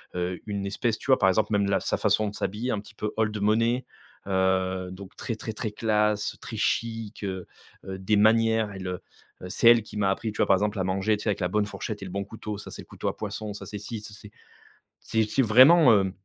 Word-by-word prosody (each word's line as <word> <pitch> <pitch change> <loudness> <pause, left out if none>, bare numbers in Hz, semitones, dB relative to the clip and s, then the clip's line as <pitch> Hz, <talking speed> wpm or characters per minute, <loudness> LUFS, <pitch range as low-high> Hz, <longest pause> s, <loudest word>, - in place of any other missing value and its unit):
heu, 90 0 -2
une 100 -1 -3
espèce 110 +2 -1
tu - - -11
vois, 130 - +5
par 95 - +4
exemple 105 +3 +1
même 100 -1 +2
la 100 - +2
sa - - -1
façon 105 0 +2
de 105 - -11
s'habiller 110 +6 -3
un 105 - -1
petit 105 +1 -13
peu 105 0 -3
old 110 -1 +1
money. 115 +4 +2 0.4
Heu, 95 -1 0
donc 95 +1 -11
très, 115 - -4
très, 110 0 -6
très 110 -1 -4
classe, 105 -1 0
très - - -7
chic, 115 -2 -2
heu 95 -2 -4 0.4
heu, 95 0 -5
des 105 +2 +1
manières 110 0 +3
elle, 95 -1 -7
heu 90 0 -4 0.4
heu, - - -5
c'est 115 - +5
elle 115 -2 +4
qui - - -13
m'a 100 -2 +2
appris, 110 +2 -2
tu - - -10
vois, - - +2
par 95 - +6
exemple, 105 +1 -1
à - - +1
manger, 95 +3 +1
tu - - -9
sais 110 - 0
avec 100 - -1
la 90 - +1
bonne 105 +1 +1
fourchette 100 +1 -6
et - - -5
le 90 - -8
bon 100 0 -3
couteau, 105 -1 -6
ça - - -9
c'est - - -8
le - - -22
couteau - - -6
à - - -5
poisson, 105 -2 -5
ça - - -8
c'est 105 0 -6
si, 105 +1 -6
ça 105 -1 -11
c'est 105 0 -13 0.7
c'est 110 -1 0
c'est 135 +5 +1
vraiment, 130 +6 +7
heu, 95 -2 +2
105 Hz, 255 wpm, -26 LUFS, 95-110 Hz, 0.7 s, vraiment